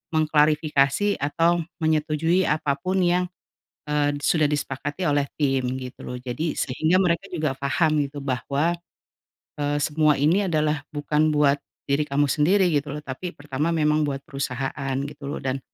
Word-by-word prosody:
mengklarifikasi 155 +3 +2
atau 165 +5 +2 0.2
menyetujui 160 +3 +2
apa 150 -2 0
pun 185 +3 0
yang, 180 +1 +2 0.6
eee, 145 -1 +1
sudah 155 +1 +2
disepakati 145 +4 -2
oleh 145 -1 +2 0.2
tim, 135 -3 +2 0.2
gitu 125 -1 -9
loh. 125 0 -6
Jadi 130 +6 -3
sehingga 160 +8 +2
mereka 175 0 +1
juga 155 -6 -1
faham 155 +3 +1
gitu 140 +1 -7
bahwa, 140 +5 -1 0.8
eee, 145 0 0
semua 155 0 +3
ini 175 +8 +2
adalah 150 -3 0
bukan 150 +1 0
buat 145 -1 +3 0.2
diri 145 +1 0
kamu 140 -1 +1
sendiri 180 +6 +3
gitu 145 -1 -1
loh, 150 - -7
tapi 150 +6 -6
pertama 145 +1 -3
memang 150 -1 +2
buat 135 -1 -4
perusahaan 135 0 -3
gitu 140 0 -7
loh, 145 - -5
dan, 135 0 -1
150 Hz, 150 wpm, -24 LUFS, 140-160 Hz, 0.8 s, semua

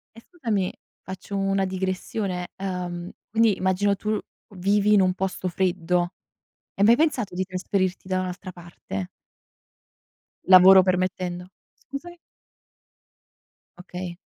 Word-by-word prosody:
E 230 - -12
scusami, 230 - -2 0.3
faccio 190 +2 -7
una 195 0 +1
digressione: 185 0 -3
uhm, 180 -2 -4 0.2
quindi 220 -2 +3
immagino 190 +2 +1
tu 215 +2 -1 0.4
vivi 205 +3 +3
in 205 - +6
un 185 -1 +2
posto 190 -1 -3
freddo. 180 -1 0 0.6
Hai 200 - +1
mai 230 +2 +7
pensato 260 - 0
di 185 - 0
trasferirti 185 0 -2
da 185 -1 0
un'altra 185 +1 -6
parte? 170 - -7 1.4
Lavoro 185 +1 +9
permettendo. 180 -1 -1 0.3
Scusami? 345 +6 -9 1.6
Okay. 180 -1 -7
185 Hz, 110 wpm, -24 LUFS, 180-200 Hz, 1.6 s, Lavoro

